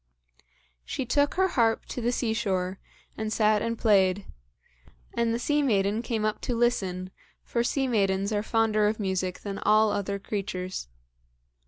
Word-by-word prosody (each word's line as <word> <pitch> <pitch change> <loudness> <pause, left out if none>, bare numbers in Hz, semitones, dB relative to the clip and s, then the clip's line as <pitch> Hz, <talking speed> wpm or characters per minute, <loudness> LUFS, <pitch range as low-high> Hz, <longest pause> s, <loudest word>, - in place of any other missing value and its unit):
She 255 - -3
took 285 +4 +1
her 380 0 +3
harp 225 -6 +2
to 245 - -4
the 240 +1 +1
sea 240 -2 0
shore, 190 -4 -1 0.4
and 220 0 -3
sat 215 -1 +3
and 230 0 -2
played; 195 -3 +3 0.9
and 235 -1 +1
the 230 - 0
sea 295 +5 +1
maiden 210 -4 +1
came 225 -3 -2
up 215 0 -1
to 245 - -2
listen, 190 -6 0 0.3
for 235 - -1
sea 270 +2 0
maidens 200 -3 +1
are 205 - +1
fonder 215 -1 +2
of 215 +1 -1
music 190 -2 -2
than 200 -1 -5
all 215 0 +4
other 200 0 -2
creatures. 185 - -4
215 Hz, 160 wpm, -27 LUFS, 195-235 Hz, 0.9 s, all